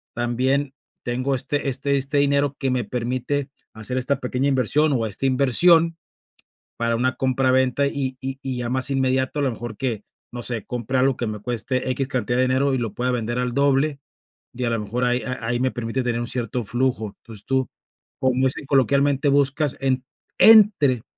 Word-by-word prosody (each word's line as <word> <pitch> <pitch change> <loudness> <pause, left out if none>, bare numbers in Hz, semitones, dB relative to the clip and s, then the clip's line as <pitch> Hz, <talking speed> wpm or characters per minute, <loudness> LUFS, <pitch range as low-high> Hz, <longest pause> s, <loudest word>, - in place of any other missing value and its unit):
también 130 +3 0 0.3
tengo 130 +3 -1
este 140 +2 -1
este 140 +2 0
este 140 +2 -1
dinero 140 0 +2
que 135 -2 -1
me 125 -1 0
permite 130 +3 -2 0.2
hacer 110 +4 -5
esta 130 +2 -1
pequeña 125 +2 -1
inversión 140 +3 +2
o 115 -4 0
esta 110 +5 -3
inversión 165 +6 +4 0.8
para 115 0 0
una 130 +2 0
compra 130 0 +1
venta 130 +2 +2
y 135 -2 -3
y 135 0 -5
y 130 -2 -4
ya 120 -1 -3
más 130 +1 +1
inmediato 130 +1 0
a - - 0
lo 135 - +1
mejor 115 -1 -7
que, 115 -5 -3 0.3
no 120 0 -6
sé, 115 -3 +1
compre 125 +1 -3
algo 135 0 +2
que 120 - -2
me 105 -1 -4
cueste 125 +3 -2
equis 130 +1 -2
cantidad 125 -2 -1
de 130 - +4
dinero 130 +2 +1
y 130 - 0
lo 115 -4 -4
pueda 125 +3 -1
vender 120 0 -2
al 125 -1 -1
doble 140 +2 +1 0.5
y 125 0 -3
a - - 0
lo 115 -1 -1
mejor 115 +4 -2
ahí 125 0 0
a 125 -3 -5
ahí 120 +1 -1
me 130 - +1
permite 120 +2 -3
tener 120 -1 -1
un 120 - -3
cierto 120 0 -2
flujo, 120 -3 -1
entonces 110 -3 -9
tú, 130 -1 0 0.5
como 130 -1 +2
dicen 130 +2 -1
coloquialmente 140 +1 +2
buscas 140 +1 +1
en 130 -1 0 0.3
entre 195 - +6
130 Hz, 195 wpm, -22 LUFS, 120-140 Hz, 0.8 s, entre